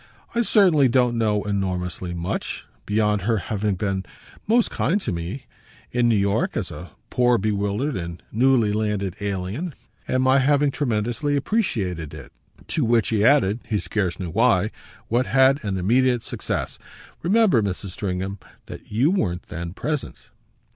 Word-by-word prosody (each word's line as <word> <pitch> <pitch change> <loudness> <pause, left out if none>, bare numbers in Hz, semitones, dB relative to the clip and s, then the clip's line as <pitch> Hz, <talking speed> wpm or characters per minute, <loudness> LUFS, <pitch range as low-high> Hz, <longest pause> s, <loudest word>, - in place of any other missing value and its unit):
"I 235 - +2
certainly 180 - +4
don't 125 -1 +2
know 105 -3 +1
enormously 90 -3 -2
much 85 +1 -4 0.2
beyond 105 -1 +1
her 110 +4 +1
having 105 0 -1
been 95 0 -2 0.4
most 230 +2 +3
kind 185 +7 +1
to 120 - -3
me, 85 +9 -5 0.5
in 120 -1 +2
New 115 - +4
York, 100 0 0
as - - -3
a - - -8 0.2
poor 125 -1 +3
bewildered 105 +6 -1
and 85 -1 -6
newly 120 -2 +3
landed 105 -3 -1
alien, 100 - -3 0.3
and 130 0 +1
my 130 +1 +5
having 145 +1 +3
tremendously 120 +2 -1
appreciated 105 - -1
it." - - -11 0.4
To 155 - 0
which 115 -2 +2
he 110 -2 +1
added, 115 -5 +4
he 110 - +1
scarce 95 -6 -2
knew 90 -3 -4
why, 110 0 +3 0.4
what 120 +2 +1
had 135 +1 +4
an 100 -3 -2
immediate 120 +5 +2
success. - - -4 0.4
"Remember, 195 - +4
Mrs. 100 -1 -3
Stringham, 95 +1 -3 0.3
that - - -11
you 125 +10 +3
weren't 90 - -1
then 85 0 -5
present." 150 +7 -4
110 Hz, 150 wpm, -23 LUFS, 95-130 Hz, 0.5 s, my